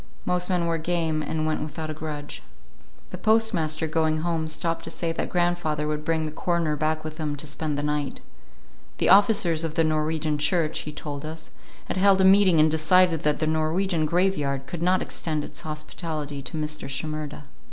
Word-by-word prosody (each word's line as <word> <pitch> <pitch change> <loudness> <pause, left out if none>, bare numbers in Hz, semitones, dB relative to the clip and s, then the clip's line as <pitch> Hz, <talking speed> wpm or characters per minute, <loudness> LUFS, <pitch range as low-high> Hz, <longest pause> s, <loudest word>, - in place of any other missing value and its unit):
Most 180 0 +1
men 180 -2 +1
were 165 -1 0
game, 160 -2 0
and 155 0 -2
went 155 0 -1
without 155 +1 -5
a - - -4
grudge. 150 -1 -6 0.7
The - - -6
postmaster, 190 -9 +2
going 155 0 0
home, 165 -1 -1
stopped 165 +1 -2
to - - -6
say 165 0 -2
that 165 - -3
grandfather 175 -4 0
would 150 0 -2
bring 160 0 0
the 155 - -3
coroner 170 -1 0
back 155 +1 -1
with 155 0 -7
him 150 -2 -2
to 145 - -9
spend 150 0 -3
the 145 - -2
night. 150 -1 -2 0.8
The - - +1
officers 190 -5 +5
of 160 -1 -3
the 165 - +3
Norwegian 155 -1 0
church, 155 +1 +1
he - - -5
told 145 -1 -6
us, 160 +1 -7 0.3
had - - -4
held 195 0 +5
a - - +4
meeting 190 -3 +6
and 155 0 +5
decided 165 +1 +4
that 150 -1 +1
the 155 - -1
Norwegian 160 +2 0
graveyard 150 -6 0
could 170 +5 -6
not 185 +2 +2
extend 155 -3 -2
its - - -5
hospitality 155 -1 -5
to 155 - -6
Mr. 150 -2 -2
Shimerda. 150 +1 -4
155 Hz, 190 wpm, -25 LUFS, 150-170 Hz, 0.8 s, meeting